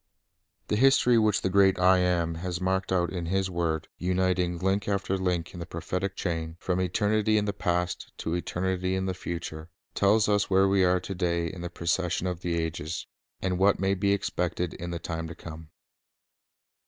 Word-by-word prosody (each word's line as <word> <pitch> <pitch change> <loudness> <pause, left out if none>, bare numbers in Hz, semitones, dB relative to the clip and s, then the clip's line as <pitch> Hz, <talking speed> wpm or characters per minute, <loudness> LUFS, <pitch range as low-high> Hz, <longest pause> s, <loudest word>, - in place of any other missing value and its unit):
The 105 - +1
history 125 -1 +5
which 110 -2 +2
the 95 - +1
great 95 0 +5
I 90 0 +5
AM 85 -2 +1
has 90 -1 -3
marked 95 +1 -1
out 90 -2 +1
in 85 -2 -3
His 95 +1 0
word, 85 -2 -1
uniting 90 -1 +1
link 95 +3 0
after 100 -1 0
link 90 -3 -1
in 90 - -8
the 85 - -5
prophetic 90 +4 -3
chain, 80 -2 -3
from 95 -1 -1
eternity 105 +3 +2
in 105 - +1
the 100 - -1
past 90 -2 -2
to 80 - -3
eternity 90 +1 -1
in 95 0 -1
the 95 - -1
future, 85 -3 -6 0.2
tells 105 +2 +3
us 105 -1 +2
where 95 0 +4
we 95 -1 +3
are 90 0 +3
to 95 - -6
day 85 -2 0
in 85 +2 -6
the 85 - -4
procession 85 0 -1
of 90 -2 -2
the 85 -1 -2
ages, 80 0 -3 0.4
and 90 -1 0
what 100 +1 +4
may 95 0 +2
be 100 +1 +1
expected 90 -3 -1
in 85 - -6
the 85 - -3
time 80 -1 -4
to 85 - -8
come. 80 -1 -10
90 Hz, 190 wpm, -27 LUFS, 85-95 Hz, 0.4 s, history